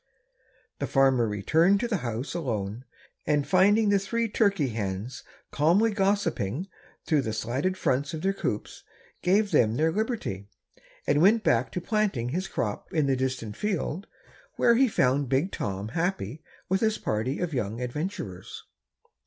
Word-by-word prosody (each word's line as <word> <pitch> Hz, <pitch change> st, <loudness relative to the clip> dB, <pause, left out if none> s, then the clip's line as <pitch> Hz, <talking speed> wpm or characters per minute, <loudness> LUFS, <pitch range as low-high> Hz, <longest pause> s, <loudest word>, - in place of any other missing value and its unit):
The -, -, -2 dB
farmer 135 Hz, -4 st, +3 dB
returned 160 Hz, -, +3 dB
to 240 Hz, -, 0 dB
the 225 Hz, -4 st, 0 dB
house 120 Hz, -2 st, -4 dB
alone 115 Hz, -, -3 dB, 0.4 s
and 145 Hz, -2 st, +2 dB
finding 205 Hz, +5 st, +4 dB
the 200 Hz, -1 st, +4 dB
three 230 Hz, +4 st, -1 dB
turkey 200 Hz, -, +1 dB
hens 105 Hz, +1 st, -4 dB, 0.3 s
calmly 180 Hz, +10 st, +3 dB
gossiping 190 Hz, -, 0 dB, 0.4 s
through 155 Hz, -3 st, +2 dB
the 110 Hz, -4 st, -3 dB
slatted 130 Hz, +12 st, -1 dB
fronts 140 Hz, -3 st, 0 dB
of 160 Hz, -, -7 dB
their 195 Hz, +1 st, +2 dB
coops, 105 Hz, -, -4 dB, 0.4 s
gave 200 Hz, +3 st, +2 dB
them 110 Hz, -1 st, +3 dB
their 160 Hz, +5 st, +2 dB
liberty, 210 Hz, -, -3 dB, 0.6 s
and 145 Hz, +1 st, +2 dB
went 215 Hz, +5 st, +5 dB
back 120 Hz, +1 st, +2 dB
to 180 Hz, -, -2 dB
planting 195 Hz, -, 0 dB
his 180 Hz, +8 st, -2 dB
crop 105 Hz, -3 st, -3 dB
in 155 Hz, -3 st, +1 dB
the 135 Hz, -1 st, +2 dB
distant 130 Hz, -5 st, -3 dB
field, 195 Hz, -2 st, -2 dB, 0.5 s
where 235 Hz, -, +4 dB
he 260 Hz, +3 st, +4 dB
found 135 Hz, -, +1 dB
Big 140 Hz, +8 st, +1 dB
Tom 100 Hz, +1 st, -4 dB
happy 160 Hz, -, -2 dB, 0.3 s
with 190 Hz, +1 st, +1 dB
his 220 Hz, -1 st, +2 dB
party 110 Hz, +6 st, -2 dB
of 175 Hz, -3 st, -2 dB
young 115 Hz, -3 st, -2 dB
adventurers. 125 Hz, -, -5 dB
150 Hz, 155 wpm, -27 LUFS, 120-195 Hz, 0.6 s, went